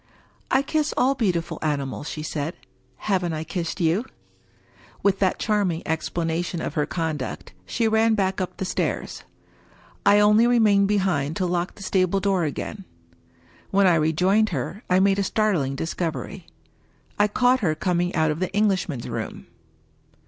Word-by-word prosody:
" - - -36
I - - -1
kiss 300 +1 -1
all 265 +2 +3
beautiful 185 -10 -1
animals/' 145 -1 -2
she 155 - -5
said. 155 +1 -3 0.3
" 130 0 -38
Haven't 180 -3 +1
I 155 0 -3
kissed 170 +2 -4
you?" 170 +5 +2 1.0
With 200 -1 +2
that 190 -2 +2
charming 200 -7 0
explanation 165 +1 -2
of - - -4
her 150 -2 0
conduct, 155 - -4
she 230 - 0
ran 220 0 +3
back 190 -2 0
up 185 - -4
the 190 - -3
stairs. 180 - -2 0.8
I 205 - +6
only 210 +3 +5
remained 210 -5 +4
behind 180 -8 0
to 185 - -1
lock 175 0 -1
the 200 - -10
stable 190 0 +1
door 195 -3 +1
again. 195 +7 -5 0.9
When 195 0 +3
I 180 - +5
rejoined 180 +7 +2
her, 170 - -4
I 180 +1 +4
made 195 +1 +3
a - - +2
startling 190 -11 0
discovery. 165 +2 -4 0.7
I 205 - +5
caught 250 +4 +3
her 160 -7 0
coming 175 +2 0
out 160 -1 +2
of 150 - -4
the 185 - -1
Eng 210 0 +4
lishman's 175 -10 -2
room. - - -5
185 Hz, 165 wpm, -24 LUFS, 160-205 Hz, 1.0 s, I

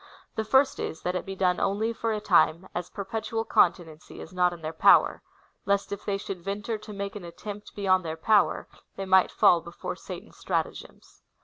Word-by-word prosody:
The 220 - -2
first 265 +5 +3
is, 160 - -5
that 180 - -1
it 180 0 -4
be 195 - -5
done 180 -2 +1
only/or 225 +3 -1
a 215 - -1
time, 180 -3 +3
as 175 0 -4
perpetual 225 +2 -4
continency 170 -6 +1
is 160 - -10
not 180 -1 +3
in 170 -2 -10
their 155 +1 -4
power, - - +5 0.5
lest 200 0 +1
if 200 0 -6
they 200 -1 0
should 195 -2 -6
venture 205 +4 -3
to 215 0 -11
make 200 0 -5
an 205 - -7
attempt 200 +5 -9
beyond 185 -2 +2
their 160 -1 -4
power, 210 +5 +2 0.3
they 195 - -4
might 190 0 +5
fall 170 - +4
before 170 +1 -6
Satan's - - -10
stratagems. - - -4
195 Hz, 190 wpm, -27 LUFS, 175-210 Hz, 0.5 s, power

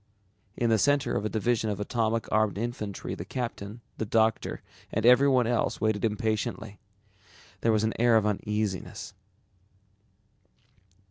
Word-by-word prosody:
In 120 -1 +1
the 110 - +4
center 145 +1 +2
of 105 - -1
a - - 0
division 110 0 0
of 105 - -3
atomic 115 +1 0
armed 110 -2 +2
infantry 105 -3 -4
the - - -5
captain, 115 -3 -5 0.2
the 110 - -1
doctor, 110 +1 +1 0.3
and 110 +1 -1
everyone 125 0 +6
else, 120 0 0
waited 110 -1 0
impatiently. 110 -1 -2 0.8
There 115 - +2
was 110 -1 +2
an 110 - +1
air 120 -1 +5
of 110 - +2
uneasiness. 105 -2 -2
110 Hz, 135 wpm, -28 LUFS, 105-120 Hz, 0.8 s, everyone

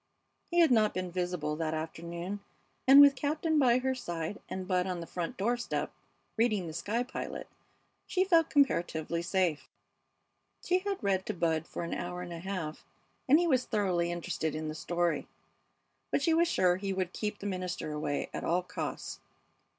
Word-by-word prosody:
He 345 0 +4
had 325 -5 +5
not 215 -3 +4
been 185 -1 -2
visible 175 -4 -2
that 160 -1 -1
afternoon, 170 +4 -5 0.5
and 270 +2 +10
with 285 -1 +9
Captain 305 +3 +1
by 250 -3 +5
her 260 +1 0
side 175 -6 -4
and 185 -1 -4
Bud 180 -1 +1
on 180 -2 -2
the 170 - -5
front 170 0 -4
door 235 +5 +1
step 240 - -2 0.5
reading 215 -5 +2
The 160 - -6
Sky 210 +8 -1
Pilot 250 - -6 0.6
she 370 - +2
felt 335 -4 +4
comparatively 170 - +1
safe. 175 -3 0 0.9
She 365 +1 +2
had 395 0 -3
read 190 -2 +1
to 215 - -2
Bud 160 -2 0
for - - -5
an 170 - -3
hour 180 0 -4
and 175 -1 -7
a 165 - -6
half, 175 -4 -4 0.5
and 290 - +8
he 350 - +2
was 260 -6 +2
thoroughly 185 -6 +1
interested 160 -2 -2
in 155 0 -3
the - - -3
story; 170 -1 -1 0.8
but 280 - +1
she 330 - +3
was 335 +1 +4
sure 180 - +3
he 195 0 -2
would 185 -1 -2
keep 210 -1 -3
the 205 - -9
minister 185 -5 -3
away 150 -1 -2
at - - -4
all 180 +2 +1
costs. 180 - -5
185 Hz, 180 wpm, -31 LUFS, 170-245 Hz, 0.9 s, and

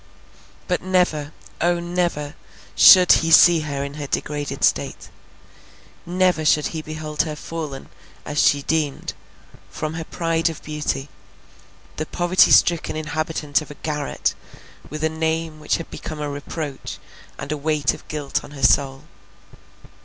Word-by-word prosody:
But 180 - 0
never, 180 -5 0 0.3
O, 175 0 +2
never, 175 -4 -2 0.4
should 185 -2 +8
he 165 - -1
see 170 +1 +7
her 145 -3 -3
in 140 0 -6
her 145 -1 -6
degraded 145 +1 -3
state. - - 0 1.0
Never 180 -2 +1
should 150 -1 +3
he 160 - -3
behold 155 -1 -3
her 155 -1 -3
fallen, 150 -3 -6 0.4
as 150 0 0
she 140 -1 +3
deemed, 155 -3 -1 0.6
from 155 0 -4
her 165 0 -4
pride 165 0 -1
of 160 - -9
beauty, 150 -2 -3 0.9
the 155 - -3
poverty 175 +1 +3
stricken 170 -3 +4
inhabitant 155 -1 -1
of 155 - -10
a 145 - -9
garret, 150 -1 -2 0.6
with 155 +2 -6
a - - +4
name 160 0 -2
which 150 - 0
had 165 - -9
become 155 -2 -7
a 150 - -3
reproach, 145 0 -6 0.4
and 140 +2 -6
a - - 0
weight 150 -1 0
of - - -13
guilt 150 -3 -3
on - - -11
her 135 - -8
soul. 135 +3 +3
155 Hz, 145 wpm, -22 LUFS, 145-165 Hz, 1.0 s, should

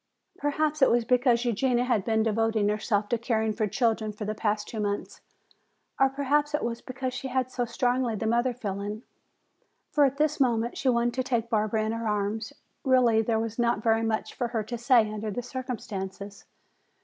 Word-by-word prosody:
Perhaps 300 +1 0
it 265 - +7
was 235 0 +2
because 245 -1 +3
Eugenia 245 +2 +1
had 240 -6 +1
been 220 +1 +1
devoting 225 -1 +1
herself 210 -1 0
to 235 - 0
caring 220 -2 0
for 215 0 0
children 220 -1 0
for 210 0 -6
the 215 - -2
past 210 -1 -1
two 220 - -6
months, 205 -1 -3 0.8
or 270 0 +5
perhaps 290 +2 +1
it - - -2
was 235 0 -3
because 255 0 -4
she 265 +1 -4
had 255 0 -1
so 245 -1 -1
strongly 245 0 0
the 220 - -3
mother 240 +3 +2
feeling. 210 -1 -5 0.9
For 295 - +4
at 275 0 0
this 300 0 +1
moment 235 -3 +1
she 270 - 0
wanted 240 -1 +2
to 255 +1 -1
take 235 -2 -1
Barbara 215 0 +1
in 220 - -1
her 230 0 -3
arms. 210 +3 -1 0.3
Really, 250 -4 +4
there 225 0 0
was 225 +1 -3
not 235 -2 +1
very 225 -1 +3
much 225 -1 -1
for 245 - -2
her 230 -2 -2
to 240 +3 -5
say 235 -2 +4
under 215 0 -4
the 245 +4 -4
circumstances. 205 -6 -6
230 Hz, 195 wpm, -27 LUFS, 215-255 Hz, 0.9 s, it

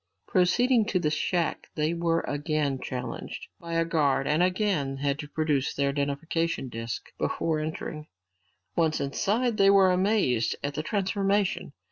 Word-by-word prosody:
Proceeding 225 +6 +3
to 205 -4 0
the 155 -3 0
shack 165 +2 -1
they 155 +2 +1
were 170 -1 +1
again 145 -2 -1
challenged 125 -1 -5
by 170 -1 -7
a 165 0 +2
guard 145 -5 +1
and 150 +4 +2
again 180 -7 +1
had 140 +1 -1
to 150 - -5
produce 150 -4 0
their 140 0 +1
identification 145 +1 -1
disks 115 0 -5
before 160 -2 0
entering. 155 0 -5 0.7
Once 160 -2 +2
inside, 215 - 0
they 195 0 +6
were 195 -2 +6
amazed 180 - +2
at 140 0 -2
the 155 - -2
transformation. 195 -1 0
160 Hz, 145 wpm, -27 LUFS, 140-185 Hz, 0.7 s, they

